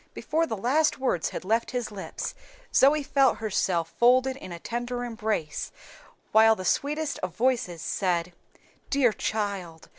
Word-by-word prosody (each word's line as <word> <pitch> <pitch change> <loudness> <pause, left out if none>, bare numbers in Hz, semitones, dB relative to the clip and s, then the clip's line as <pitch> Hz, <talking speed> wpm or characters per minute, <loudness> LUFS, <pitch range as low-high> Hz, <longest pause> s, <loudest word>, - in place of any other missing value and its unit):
Before 325 +1 0
the 220 - -3
last 285 +10 +2
words 255 - 0
had - - -6
left 225 +4 +1
his 245 -4 -3
lips 200 -2 -5 0.4
Zoe 290 +2 +5
felt 270 -2 +3
herself 185 -6 -1
folded 255 +2 +4
in 225 -9 -10
a 170 - -5
tender 240 +6 -4
embrace, 220 -10 -3 0.6
while 220 0 +6
the 185 - -7
sweetest 295 +5 0
of 180 -2 -5
voices 225 -8 0
said, 175 -2 -1 0.6
"Dear 265 -5 +3
child! 200 -8 -3
225 Hz, 145 wpm, -27 LUFS, 185-260 Hz, 0.6 s, while